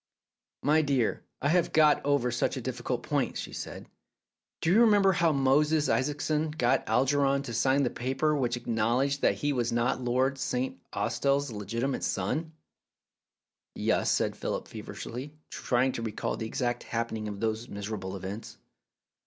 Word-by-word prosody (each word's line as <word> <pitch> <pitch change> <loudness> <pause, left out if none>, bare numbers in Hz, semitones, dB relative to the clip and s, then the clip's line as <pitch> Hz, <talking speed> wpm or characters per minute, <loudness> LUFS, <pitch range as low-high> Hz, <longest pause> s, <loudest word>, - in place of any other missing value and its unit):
"My 155 +2 +4
dear, 135 -6 +1 0.2
I 145 - +3
have 175 +1 +2
got 155 -1 +5
over 140 -4 +2
such 120 - 0
a - - -3
difficult - - -3
point," - - -1
she - - -6
said. - - -6 0.8
"Do 165 - +2
you 220 - +6
remember 205 -4 +5
how 170 -2 +3
Moses 150 +2 +3
Isaacson 150 +5 0
got 135 -6 +1
Algernon 135 +3 +2
to 120 -4 -6
sign 135 +5 +3
the 125 - 0
paper 135 +5 0
which 120 -4 0
acknowledged 120 +4 0
that - - +3
he 145 0 -1
was 120 -3 0
not 120 +2 +1
Lord 130 +2 +1
St. 125 -8 -2
Austell's 130 +6 0
legitimate 115 +6 -2
son?" 155 - -1 1.2
"Yes, - - -5
yes," - - +2
said - - +1
Philip - - -3
feverishly, 135 +6 -7 0.2
trying 130 +1 +1
to 120 - -5
re 115 -2 -3
call - - -2
the 110 - -4
exact 120 +1 -1
happening 115 -2 -3
of 100 -1 -5
those 110 +2 -2
miserable 100 -2 -5
events. 100 +4 -7
130 Hz, 160 wpm, -29 LUFS, 115-145 Hz, 1.2 s, you